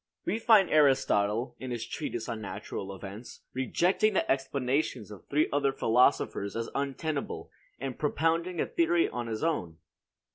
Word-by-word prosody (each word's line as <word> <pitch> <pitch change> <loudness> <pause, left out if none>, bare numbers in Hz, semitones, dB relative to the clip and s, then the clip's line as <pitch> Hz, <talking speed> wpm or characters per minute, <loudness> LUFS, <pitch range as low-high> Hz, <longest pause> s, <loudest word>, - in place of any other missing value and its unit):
We 220 - 0
find 220 -4 +6
Aristotle, 125 -6 +3
in 130 - -6
his 120 -2 -3
treatise 115 -2 -4
on 110 -1 -4
natural 100 -1 -6
events, 100 +5 -9
rejecting 185 - +1
the - - +2
explanations 135 -4 -1
of 100 - -12
three 150 +2 +2
other 140 -1 +2
philosophers 120 -5 +2
as 115 0 -3
untenable, 140 +2 -3 0.3
and 135 -1 -5
propounding 165 +3 0
a - - +2
theory 340 0 +2
of 120 -1 -4
his 110 +2 -3
own. 90 - -1
135 Hz, 145 wpm, -29 LUFS, 115-160 Hz, 0.3 s, find